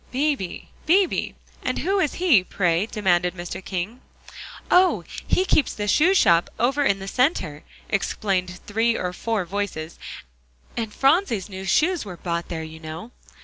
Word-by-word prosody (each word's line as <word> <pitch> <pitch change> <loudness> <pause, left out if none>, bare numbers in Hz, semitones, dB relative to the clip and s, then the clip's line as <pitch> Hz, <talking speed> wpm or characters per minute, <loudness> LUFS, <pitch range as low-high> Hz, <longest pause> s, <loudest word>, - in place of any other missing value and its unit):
"Beebe 270 - -1 0.2
Beebe, 370 +3 +2 0.3
and - - -2
who 390 +2 +1
is 305 -6 0
he, 320 - +4
pray?" 180 +1 0
demanded 180 -5 +1
Mr. 175 +1 -6
King. 195 +8 -4 0.7
"Oh! 365 +1 +4 0.2
he 370 - +2
keeps 310 - +2
the 205 -1 -3
shoe 330 - +4
shop 170 - +4
over 270 +5 +2
in 200 -8 +2
the 195 0 -8
Center," 220 - 0 0.2
explained 185 -3 -1
three 225 +2 +1
or 180 0 -3
four 220 0 -2
voices, 175 -4 -4 0.8
"and 225 -2 -3
Phronsie's 270 - +2
new 190 -1 -7
shoes 335 - +2
were 185 -4 -8
bought 170 0 -3
there, 160 -2 -4
you 160 0 -9
know." 160 +8 -8
205 Hz, 150 wpm, -23 LUFS, 180-275 Hz, 0.8 s, he